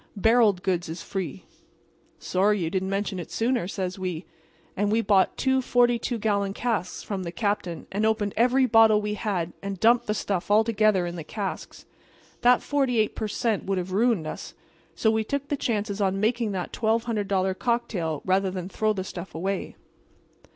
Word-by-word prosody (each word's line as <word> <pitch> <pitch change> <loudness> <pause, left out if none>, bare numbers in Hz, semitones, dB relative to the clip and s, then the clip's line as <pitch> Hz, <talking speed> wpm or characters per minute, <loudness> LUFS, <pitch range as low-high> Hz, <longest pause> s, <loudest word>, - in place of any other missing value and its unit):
Barrelled 215 -3 +3
goods 175 -4 -1
is 165 - -6
free.' 160 - -5 0.7
"'Sorry 205 +3 +1
you 160 - -2
didn't 190 0 -1
mention 195 -1 -2
it 170 - -7
sooner,' 235 -4 0
says 185 -1 -4
we. 180 -2 -4 0.5
And 205 +1 0
we 225 +1 +3
bought 200 -3 +3
two 265 0 +2
forty 245 -1 +3
two 240 +1 -2
gallon 200 -2 0
casks 220 -7 -2
from 200 -3 -4
the 170 -2 -5
captain, 200 -4 -2
and 205 +2 -1
opened 215 -2 +1
every 250 +3 +4
bottle 225 -2 +6
we 210 0 -2
had 190 -6 -2
and 195 -2 -5
dumped 235 +3 +4
the 210 - 0
stuff 195 -4 -2
all 210 +2 +5
together 215 -4 +2
in 175 0 -5
the 165 - -5
casks. 195 +4 -6 0.6
That 245 0 +5
48 250 -7 +1
per 220 - -2
cent. 220 0 -1
would 195 0 -1
have 180 +1 -3
ruined 215 -3 +2
us; 155 - -7 0.4
so 220 - +2
we 220 0 +1
took 280 +5 -3
the 290 - +1
chances 210 -5 -2
on 195 0 +1
making 225 +1 +1
that 180 -2 -4
$1,200 210 -5 0
cocktail 185 - -1
rather 190 +1 +2
than 185 -1 -5
throw 215 +1 0
the 190 -2 -3
stuff 190 -1 -8
away. 190 +4 -3
205 Hz, 180 wpm, -26 LUFS, 185-225 Hz, 0.7 s, bottle